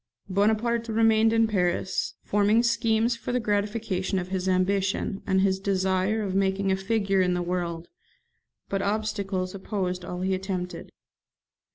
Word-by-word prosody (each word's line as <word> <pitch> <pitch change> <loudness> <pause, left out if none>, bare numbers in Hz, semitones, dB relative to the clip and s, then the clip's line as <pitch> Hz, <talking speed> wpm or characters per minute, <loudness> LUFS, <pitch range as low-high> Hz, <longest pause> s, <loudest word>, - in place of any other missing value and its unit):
Bonaparte 220 +4 +1
remained 225 0 +3
in 225 0 +4
Paris, 185 -3 -1
forming 210 +3 +3
schemes 230 0 +2
for 235 - -5
the 250 - +1
gratification 205 -3 -1
of 180 0 -3
his 190 0 -1
ambition, 195 +2 0
and 190 -1 +3
his 190 -1 +2
desire 190 +2 0
of 195 -2 -3
making 195 0 +1
a - - +3
figure 195 0 +1
in 180 -1 +2
the 175 - -1
world; 175 -1 -3 0.8
but 195 0 -1
obstacles 200 -3 -2
opposed 185 -2 -3
all 180 0 -5
he 190 +1 0
attempted. 185 -1 -4
195 Hz, 145 wpm, -26 LUFS, 185-220 Hz, 0.8 s, in